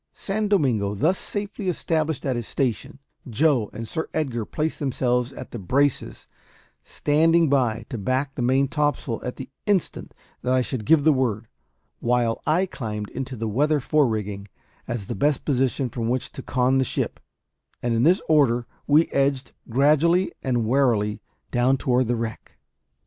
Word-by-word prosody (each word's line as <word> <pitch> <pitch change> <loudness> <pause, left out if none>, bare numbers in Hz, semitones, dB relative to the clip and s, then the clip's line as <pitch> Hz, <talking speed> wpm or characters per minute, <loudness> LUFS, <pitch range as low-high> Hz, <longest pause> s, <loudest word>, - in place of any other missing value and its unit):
San 210 +2 -2
Domingo 120 - +1
thus 160 - +1
safely 205 -1 -4
established 160 -4 -1
at 130 -2 0
his 120 -2 -4
station, 130 -1 -2 0.3
Joe 130 -3 +2
and 115 +1 -7
Sir 160 +5 -4
Edgar 130 -8 -1
placed 155 +7 -3
themselves 125 -2 0
at - - -9
the 120 - -6
braces, 135 +8 0 0.6
standing 165 +2 +2
by 120 -5 +1
to 120 - -4
back 130 +6 -1
the - - -4
main 130 +3 +3
topsail 145 -5 -1
at 125 - -4
the 130 - -7 0.2
instant 200 -4 -1 0.3
that 125 +1 +1
I 130 - +3
should 120 -4 -4
give 160 -3 +5
the 155 0 +5
word; 120 -5 -1 0.5
while 120 -1 +1
I 170 +5 +3
climbed 105 - -5
into 130 0 -5
the 115 -1 -3
weather 145 +8 +2
fore 145 +2 +2
rigging, 105 -3 -3 0.4
as 120 -4 -4
the - - -4
best 145 +6 0
position 135 -1 +1
from 115 -1 -3
which 125 +1 -2
to - - -8
con 130 +1 +1
the - - +3
ship; - - -3 0.6
and 120 -1 +1
in 115 - +1
this 175 +8 +4
order 130 -6 +3 0.2
we 150 +3 +5
edged 135 -1 0 0.2
gradually 155 +8 +3
and 120 -3 0
warily 110 -5 +1 0.3
down 125 +2 +3
toward 125 -1 +1
the 120 - +1
wreck. 115 -1 -6
130 Hz, 165 wpm, -24 LUFS, 120-150 Hz, 0.6 s, give